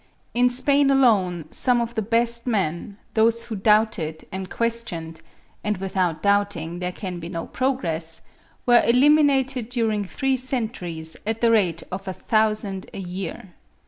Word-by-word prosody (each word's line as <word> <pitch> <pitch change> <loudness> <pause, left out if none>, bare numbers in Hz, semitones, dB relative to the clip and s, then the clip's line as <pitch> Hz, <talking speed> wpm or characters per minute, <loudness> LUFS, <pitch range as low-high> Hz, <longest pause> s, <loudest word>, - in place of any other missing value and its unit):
In 245 +1 +4
Spain 280 +3 +2
alone 200 - +3
some 250 -2 +2
of 235 0 -2
the 220 - -1
best 235 +2 0
men—those 220 +3 0
who 225 - -5
doubted 205 -6 +1
and 190 0 -5
questioned, 225 -9 -3 0.4
and 210 -1 -1
without 185 -3 -1
doubting 200 -5 0
there 180 0 -2
can 180 -2 -6
be 165 0 -7
no 165 -2 -4
progress—were 205 -1 -1
eliminated 270 -1 +3
during 225 -4 0
three 265 +7 -1
centuries 215 -11 -3
at 225 0 -2
the 230 -1 +4
rate 180 -7 +2
of 185 +1 -6
a 190 - -2
thousand 215 -2 0
a - - -5
year. 185 0 -6
215 Hz, 140 wpm, -23 LUFS, 180-240 Hz, 0.4 s, In